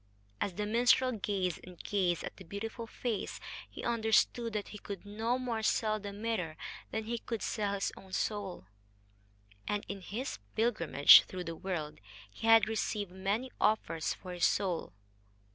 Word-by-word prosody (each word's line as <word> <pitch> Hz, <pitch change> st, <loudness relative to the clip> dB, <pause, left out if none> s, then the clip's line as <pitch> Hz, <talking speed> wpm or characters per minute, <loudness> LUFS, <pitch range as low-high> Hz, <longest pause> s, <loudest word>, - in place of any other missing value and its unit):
As 200 Hz, -, 0 dB
the 210 Hz, +3 st, -2 dB
minstrel 245 Hz, +4 st, +4 dB
gazed 195 Hz, -5 st, -1 dB
and 180 Hz, -1 st, -11 dB
gazed 180 Hz, -4 st, 0 dB
at -, -, -6 dB
the 190 Hz, -, -10 dB
beautiful 220 Hz, +6 st, -5 dB
face, 230 Hz, -2 st, -3 dB, 0.3 s
he -, -, -9 dB
understood 230 Hz, 0 st, +2 dB
that 210 Hz, -1 st, -3 dB
he 210 Hz, -, -8 dB
could 200 Hz, -1 st, -7 dB
no 225 Hz, +4 st, -1 dB
more 240 Hz, -3 st, -2 dB
sell 215 Hz, 0 st, +1 dB
the 205 Hz, 0 st, -6 dB
mirror 200 Hz, -7 st, -2 dB, 0.3 s
than 220 Hz, -, -2 dB
he 230 Hz, +2 st, -3 dB
could 230 Hz, -1 st, -4 dB
sell 205 Hz, -2 st, -1 dB
his 195 Hz, -, -1 dB
own 190 Hz, -, -14 dB
soul 200 Hz, -, -2 dB, 1.0 s
and, 205 Hz, 0 st, -1 dB
in 200 Hz, -1 st, -5 dB
his 220 Hz, -, -4 dB, 0.2 s
pilgrimage 170 Hz, -, +7 dB
through 185 Hz, -1 st, -5 dB
the 165 Hz, -1 st, -5 dB
world, 160 Hz, -4 st, -4 dB, 0.3 s
he 225 Hz, -, -5 dB
had 225 Hz, -1 st, +7 dB
received 210 Hz, -3 st, -1 dB
many 200 Hz, +7 st, -1 dB
offers 165 Hz, -7 st, +1 dB
for 180 Hz, -1 st, -8 dB
his 175 Hz, -, +2 dB
soul. 180 Hz, -, 0 dB
205 Hz, 160 wpm, -32 LUFS, 185-225 Hz, 1.0 s, pilgrimage